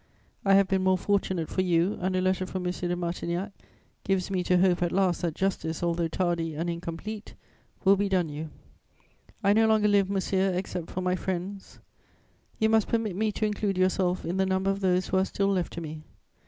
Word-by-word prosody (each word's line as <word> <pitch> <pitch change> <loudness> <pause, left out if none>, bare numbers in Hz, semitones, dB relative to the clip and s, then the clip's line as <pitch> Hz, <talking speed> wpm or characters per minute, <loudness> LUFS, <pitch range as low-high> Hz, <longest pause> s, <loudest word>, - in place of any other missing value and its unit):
I 195 -1 +5
have 195 -1 +5
been 190 0 +1
more 185 0 +3
fortunate 190 -4 0
for 185 - -1
you, 180 +1 +1
and 185 +1 0
a 185 - +1
letter 185 0 0
from 185 0 -4
M. 180 - +1
de 175 -1 -2
Martignac 175 +2 -3 0.5
gives 195 -1 0
me 185 -2 0
to 180 - +3
hope 180 -1 +3
at 175 -1 +1
last 185 -3 +1
that 165 -3 -1
justice, 175 -4 -2
although 170 -1 +1
tardy 165 -2 -1
and 170 +3 -2
incomplete, 170 +6 -6 0.5
will 195 +1 +7
be 200 0 0
done 185 -3 +2
you. 155 +1 -6 0.9
I 200 0 +5
no 220 +1 +4
longer 215 -1 +4
live, 200 -2 +3
monsieur, 190 -1 +1
except 180 -2 -4
for 185 - -4
my 180 0 +1
friends; 190 +2 -5 0.8
you 220 - +3
must 220 -1 +3
permit 225 -5 -1
me 215 +2 0
to 215 - -1
include 205 -2 -1
yourself 185 -1 +1
in 175 +3 -2
the 190 - +2
number 190 +1 +1
of 195 - -3
those 185 -1 +1
who 190 - +1
are 190 - +4
still 195 0 0
left 185 -3 0
to 170 - -5
me. 155 -1 -7
185 Hz, 210 wpm, -27 LUFS, 175-195 Hz, 0.9 s, will